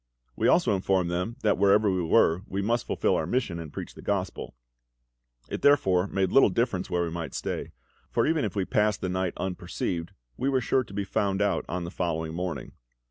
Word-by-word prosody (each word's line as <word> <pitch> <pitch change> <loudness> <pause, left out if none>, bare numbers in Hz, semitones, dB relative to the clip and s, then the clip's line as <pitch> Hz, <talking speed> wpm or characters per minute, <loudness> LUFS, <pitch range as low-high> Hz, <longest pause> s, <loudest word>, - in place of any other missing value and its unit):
We - - +1
also 145 -11 +4
informed 95 -2 +1
them 90 +7 -2
that 105 -3 +2
wherever 100 +2 +4
we 95 -1 0
were 80 +1 +3
we 100 +1 -2
must 115 +3 0
fulfil - - +1
our 80 - -1
mission, 100 -6 -1
and 80 -3 -7
preach - - -7
the - - -12
Gospel; 95 -9 -3 0.9
it - - -5
therefore 95 -10 +4
made 95 -1 0
but - - -7
little 135 - +7
difference 95 -2 -1
where 90 0 +1
we 85 - -3
might 85 -1 -5
stay, - - -4 0.4
for - - +1
even 160 -1 +1
if 100 - -3
we 95 -2 0
passed 105 -1 +1
the 95 - -2
night 95 -1 -1
unperceived, 85 -2 -3 0.2
we 135 - 0
were 135 -1 +2
sure 130 +2 +1
to 100 - -13
be 100 - -1
found 100 -1 0
out 100 -1 +1
on 90 0 -2
the 85 - -6
following 80 -3 -2
morning. 90 0 -4
95 Hz, 210 wpm, -27 LUFS, 90-105 Hz, 0.9 s, little